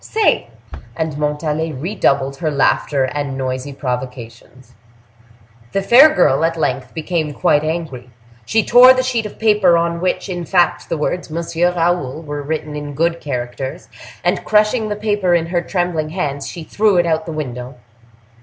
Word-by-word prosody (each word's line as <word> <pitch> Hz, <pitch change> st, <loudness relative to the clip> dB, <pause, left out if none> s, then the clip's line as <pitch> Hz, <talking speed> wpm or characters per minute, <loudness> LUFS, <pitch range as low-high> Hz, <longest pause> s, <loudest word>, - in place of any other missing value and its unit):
—say." 440 Hz, -, +1 dB, 0.5 s
And 160 Hz, +1 st, -3 dB
Montalais 150 Hz, +2 st, -2 dB
redoubled 140 Hz, -3 st, 0 dB
her 160 Hz, 0 st, -1 dB
laughter 140 Hz, -1 st, +1 dB
and 140 Hz, 0 st, -3 dB
noisy 130 Hz, +1 st, -3 dB
provocations. 125 Hz, -2 st, -7 dB, 1.0 s
The 195 Hz, -, 0 dB
fair 255 Hz, +9 st, +8 dB
girl 135 Hz, -, +3 dB
at 165 Hz, 0 st, 0 dB
length 130 Hz, -4 st, -2 dB
became 160 Hz, -2 st, -2 dB
quite 145 Hz, +5 st, +2 dB
angry; 155 Hz, -6 st, -4 dB, 0.3 s
she 220 Hz, -, +1 dB
tore 250 Hz, +2 st, +8 dB
the 255 Hz, -, +1 dB
sheet 240 Hz, -4 st, -1 dB
of -, -, -14 dB
paper 210 Hz, -6 st, +4 dB
on 170 Hz, 0 st, -1 dB
which, 185 Hz, -, -1 dB
in 175 Hz, -2 st, -4 dB
fact, 175 Hz, 0 st, +1 dB
the 165 Hz, -, -1 dB
words 165 Hz, +4 st, -2 dB
"Monsieur 170 Hz, +2 st, 0 dB
Raoul" 165 Hz, -4 st, -1 dB
were 145 Hz, -1 st, -5 dB
written 150 Hz, 0 st, -4 dB
in 145 Hz, -1 st, -6 dB
good 170 Hz, +2 st, 0 dB
characters; 125 Hz, -1 st, -5 dB, 0.3 s
and -, -, 0 dB
crushing 215 Hz, +1 st, +2 dB
the 210 Hz, -, -2 dB
paper 205 Hz, -4 st, +1 dB
in 165 Hz, -1 st, +1 dB
her 175 Hz, +1 st, -1 dB
trembling 175 Hz, -4 st, -2 dB
hands, 145 Hz, -5 st, -3 dB
she 170 Hz, -, -7 dB
threw 205 Hz, +3 st, +1 dB
it 175 Hz, -, +3 dB
out 160 Hz, -1 st, +1 dB
of 160 Hz, -, -15 dB
the 165 Hz, -, -4 dB
window. 125 Hz, -4 st, -6 dB
160 Hz, 165 wpm, -18 LUFS, 140-180 Hz, 1.0 s, fair